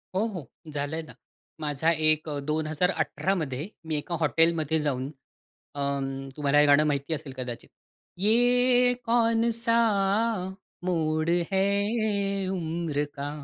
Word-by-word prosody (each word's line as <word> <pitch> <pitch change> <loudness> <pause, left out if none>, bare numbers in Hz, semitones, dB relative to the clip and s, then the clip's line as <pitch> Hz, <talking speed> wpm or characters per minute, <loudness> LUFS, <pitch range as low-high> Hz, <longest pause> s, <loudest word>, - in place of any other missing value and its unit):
हो, 200 +4 +2
हो 180 - -7 0.2
झालंय 145 +2 -2
ना. 155 - -12 0.5
माझा 150 +2 +1
एक 155 -1 +1
अ, 145 -1 -3
2018 155 +6 0
मध्ये 150 -2 -3 0.2
मी 160 -1 -2
एका 150 +4 -3
हॉटेलमध्ये 160 0 +2
जाऊन 135 -3 -1 0.7
अं, 135 -1 -2
तुम्हाला 145 0 +3
हे 150 - +6
गाणं 145 +1 +6
माहिती 140 +2 -1
असेल 150 -3 -5
कदाचित, 120 -2 -6 0.5
"ये 245 +4 +4
कौनसा 230 0 +2 1.1
मोड 155 -2 0 0.2
है 190 0 +3 0.9
उम्र 165 -4 -2
का?" 140 0 -4
155 Hz, 115 wpm, -27 LUFS, 145-185 Hz, 1.1 s, हे